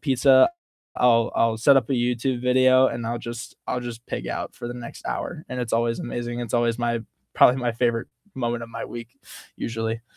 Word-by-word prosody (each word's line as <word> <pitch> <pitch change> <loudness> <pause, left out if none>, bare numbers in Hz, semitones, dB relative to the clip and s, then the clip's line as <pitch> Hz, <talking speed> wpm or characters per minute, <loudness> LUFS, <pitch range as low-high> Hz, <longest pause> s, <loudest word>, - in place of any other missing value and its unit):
pizza, 130 -1 +5 0.5
I'll 115 -1 +4
I'll 115 -1 +2
set 135 +4 +6
up 130 -1 +1
a - - +3
YouTube 125 +1 0
video, 130 +1 +5
and 115 -1 -5
I'll 120 0 -2
just 115 0 -7
I'll 125 - -1
just 120 -1 -8
pig - - -4
out - - -4
for - - -7
the - - -4
next 120 -1 -9
hour, 160 -3 -4
and 125 0 -3
it's 120 -2 -4
always 115 0 +1
amazing. 120 0 -4
It's 120 0 -4
always 120 0 +1
my 120 -1 0 0.3
probably 125 - +6
my 120 -1 0
favorite 115 0 0 0.3
moment 120 -2 -2
of 115 - -7
my - - -5
week 120 -1 -8 0.5
usually. 115 0 -3
120 Hz, 200 wpm, -24 LUFS, 115-125 Hz, 0.5 s, set